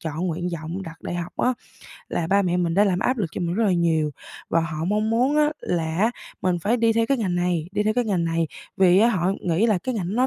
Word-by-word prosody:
chọn 160 +3 -3
nguyện 175 +1 -2
vọng 165 +4 -5
đặt 165 -3 -10
đại - - -4
học 175 0 -4
á, 255 - +2 0.6
là 165 - -1
ba 200 +3 +3
mẹ 180 -2 0
mình 170 -2 0
đã 200 +3 +5
làm 185 -3 +1
áp 255 +5 0
lực 205 - 0
cho - - -5
mình 170 0 -1
rất 225 +3 +1
là 200 - +3
nhiều, 165 -3 +1 0.4
và 165 - +3
họ 160 -1 -3
mong 210 +4 0
muốn 255 +6 +2
á 300 0 +4
là 165 -1 -2
á 220 +4 +3 0.3
mình 180 -2 +1
phải 215 +8 +1
đi 230 -1 +3
theo 230 0 +1
cái 275 +1 +1
ngành 190 -6 -1
này, 175 -2 0
đi 210 - +1
theo 215 +1 +1
cái 245 - +1
ngành 190 -6 0
này 165 0 0 0.3
vì 185 -1 +5
á 225 +3 +5
họ 185 -4 +1
nghĩ 180 +6 +1
là 215 -5 +2
cái 250 +7 -3
ngành 190 -6 -2
ấy 200 - -3
nó 255 +1 +3
180 Hz, 280 wpm, -23 LUFS, 170-220 Hz, 0.6 s, đã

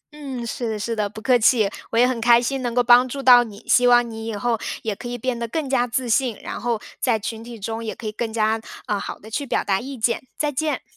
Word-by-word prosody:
嗯， 270 -5 -6
是 235 0 -3
的 220 - -2
是 230 +2 -3
的， 210 -2 -1
不 210 - -10
客 250 -2 +4
气， 220 -1 +4 0.2
我 230 - -2
也 245 +1 +6
很 250 -2 -2
开 235 0 +6
心 265 +2 -2
能 240 -1 -3
够 245 - +4
帮 245 +1 +6
助 275 +2 -5
到 245 -2 +8
你， 210 -3 -12
希 245 0 +5
望 240 0 +5
你 225 0 -7
以 225 - -3
后 230 +2 -1 0.2
也 215 -2 -2
可 240 - -8
以 245 0 -4
变 245 0 -2
得 235 - -3
更 295 +5 -3
加 250 -2 +1
自 245 +1 -2
信， 235 -1 +1
然 - - -6
后 235 -2 -1 0.2
在 240 -4 +2
群 220 +1 -6
体 235 -1 -10
中 225 +3 -4
也 220 - -4
可 235 - -11
以 215 - -2
更 225 +1 -4
加， 220 0 +1 0.2
呃， 205 -1 -1
好 - - -6
的 220 - -14
去 285 - -2
表 - - 0
达 195 -1 +1
意 270 +3 -7
见， 230 +1 0 0.2
再 300 -1 0
见。 305 +2 -2
235 Hz, 295 characters per minute, -22 LUFS, 220-250 Hz, 0.2 s, 到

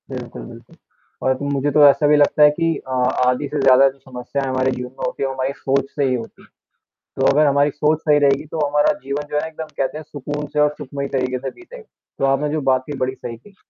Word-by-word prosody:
बिल्कुल, - - -7
बिल्कुल। - - -14 0.5
और 130 0 +2 0.2
मुझे 140 +1 0
तो 145 +1 +6
ऐसा 145 +1 +4
भी 150 - +5
लगता 145 +1 +4
है 150 - +8
कि 165 +2 0
अ, - - -7 0.4
आधी 125 +3 0
से 150 +1 -3
ज़्यादा 135 +1 +6
जो 135 +1 -15
समस्याएँ 130 +1 -5
हमारे 130 0 0
जीवन 125 -1 -5
में 130 - -9
होती - - -3
हैं, - - +1
वो - - -4
हमारी 130 +1 -2
सोच 135 0 -1
से 145 - 0
ही 130 -1 +1
होती 115 -2 -8
हैं। - - -20 0.7
तो - - +3
अगर 150 +2 +4
हमारी 140 +1 +3
सोच 150 +2 +1
सही 150 -2 +3
रहेगी, 140 -1 +2
तो 155 0 -2
हमारा 145 +4 +2
जीवन 140 +2 -4
जो 150 - 0
है - - -4
एकदम 160 0 -7
कहते 135 +3 -2
हैं 155 - -9
सुकून 145 0 -5
से 150 - +1
और 150 - +5
सुखमय 140 +1 -5
तरीके 130 -1 -1
से 135 +1 -5
बीतेगा। 465 +7 -13 0.4
तो - - -1
आपने 135 +2 +1
जो 155 +1 -1
बात 130 0 +2
कही, 145 -2 -6
बड़ी 130 0 -1
सही 115 -3 -8
कही। 200 - -20
140 Hz, 250 wpm, -20 LUFS, 130-150 Hz, 0.7 s, है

